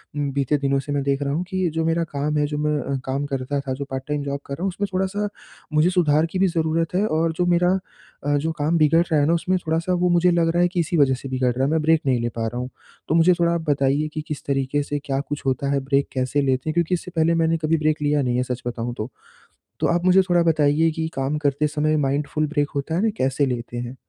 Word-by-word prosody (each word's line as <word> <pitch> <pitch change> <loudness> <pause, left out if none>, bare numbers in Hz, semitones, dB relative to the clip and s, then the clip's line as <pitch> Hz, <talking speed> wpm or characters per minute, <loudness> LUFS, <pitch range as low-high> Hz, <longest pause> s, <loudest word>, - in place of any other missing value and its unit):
उम, 145 -1 -1
बीते 140 +1 +1
दिनों 140 -1 +1
से 140 +2 -6
मैं 140 -1 0
देख 140 0 0
रहा 140 0 -1
हूँ 170 +4 -1
कि 185 -2 0
जो 160 0 0
मेरा 165 +1 +1
काम 150 +2 -1
है 150 - +2
जो 150 0 -4
मैं 150 -2 -1
काम 135 +2 -2
करता 140 0 -2
था 135 -1 -3
जो 140 +1 -5
पार्ट 130 0 -3
टाइम 150 -1 -2
जॉब 140 0 -3
कर 140 - -6
रहा 165 - -5
हूँ 195 - +1
उसमें 200 +2 -3
थोड़ा-सा 190 +3 -1 0.5
मुझे 155 +3 +4
सुधार 160 -4 +3
की 175 +3 -4
भी 195 - +4
ज़रूरत 165 0 0
है 200 +3 +2
और 160 -1 +1
जो 175 +2 0
मेरा 175 +1 +3 0.5
अ, 145 +1 +1
जो 160 +3 -1
काम 160 +1 0
बिगड़ 165 +2 +4
रहा 155 - +4
है 145 - +3
ना 165 - +3
उसमें 180 +3 +1
थोड़ा-सा 165 +3 0
वो 180 0 +2
मुझे 175 +1 +4
लग 170 -1 +2
रहा 175 - +2
है 175 - +4
कि 180 0 -3
इसी 170 +1 0
वज़ह 135 -3 +4
से 135 +2 -8
बिगड़ 130 -1 +1
रहा 130 - 0
है - - +1
मैं 160 -1 +2
ब्रेक 160 0 +3
नहीं 130 -2 +2
ले 120 - -1
पा 115 -1 -1
रहा 120 +2 -5
हूँ। 125 +1 -4 0.4
तो 160 - +1
मुझे 170 +2 +5
थोड़ा 170 0 +3
आप 170 - -1
बताइए 140 +1 +2
कि, 155 - -3
किस 150 -3 -5
तरीके 140 +1 0
से 145 0 -3
क्या 135 -2 -1
कुछ 145 0 -5
होता 135 +1 0
है, 140 - +2
ब्रेक 140 0 +1
कैसे 130 +2 0
लेते 130 +1 0
हैं, - - -1
क्योंकि 170 +1 0
इससे 180 +1 -3
पहले 165 +1 +3
मैंने 165 0 +2
कभी 160 +1 +1
ब्रेक 155 0 0
लिया 145 0 +2
नहीं 125 -1 0
है 125 - +1
सच 125 -1 -4
बताऊँ 120 0 -3
तो। 110 +4 -4 0.7
तो - - +2
आप 175 +1 0
मुझे 185 +1 +6
थोड़ा 175 -1 +4
बताइए 155 +1 +3
कि 160 0 -3
काम 135 +3 -1
करते 145 0 +1
समय 155 +1 0
माइंडफुल 150 +2 -1
ब्रेक 145 -1 0
होता 140 +3 -2
है 180 - +1
ना 225 - +3
कैसे 135 +2 +1
लेते 120 -2 -4
हैं? 120 +1 -5
150 Hz, 275 wpm, -22 LUFS, 140-165 Hz, 0.7 s, मुझे